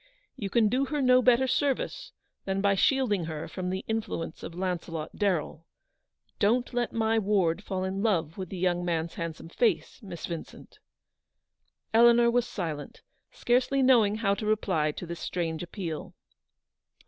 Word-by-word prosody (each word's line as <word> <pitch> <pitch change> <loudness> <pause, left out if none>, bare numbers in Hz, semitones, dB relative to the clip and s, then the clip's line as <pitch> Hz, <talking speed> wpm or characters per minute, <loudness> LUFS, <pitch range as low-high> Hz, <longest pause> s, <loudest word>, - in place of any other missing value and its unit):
You 200 - -4
can 225 +1 +3
do 255 +6 +1
her 295 +2 -2
no 255 -1 +5
better 250 +1 +4
service 285 - -1 0.3
than 195 0 -1
by 200 0 +3
shield 260 +3 +2
ing 180 -5 -1
her 155 -1 -5
from 180 -1 -4
the 190 +1 -3
influence 220 -7 -3
of 165 - -8
Launcelot 175 -3 -4
Darrell. 170 -5 -1 0.7
Don't 240 +4 +2
let 240 -1 0
my 225 0 +1
ward 195 -3 +1
fall 190 -2 -3
in 190 +1 -2
love 170 -7 0
with 185 -3 -6
the 190 - -6
young 175 -1 0
mans 165 -1 -1
handsome 165 -1 -6
face, 235 +7 0
Miss 180 -6 -7
Vincent! 170 -2 -8 0.6
" - - -49
Eleanor 235 +1 +6
was 245 0 +1
silent, 155 -6 -5 0.3
scarcely 255 +3 +1
knowing 230 -5 +5
how 205 -3 +1
to 210 +1 -4
reply 185 -8 +1
to 175 - -7
this 170 0 -6
strange 165 -3 -3
appeal. 175 -3 -6
195 Hz, 160 wpm, -28 LUFS, 170-235 Hz, 0.7 s, Eleanor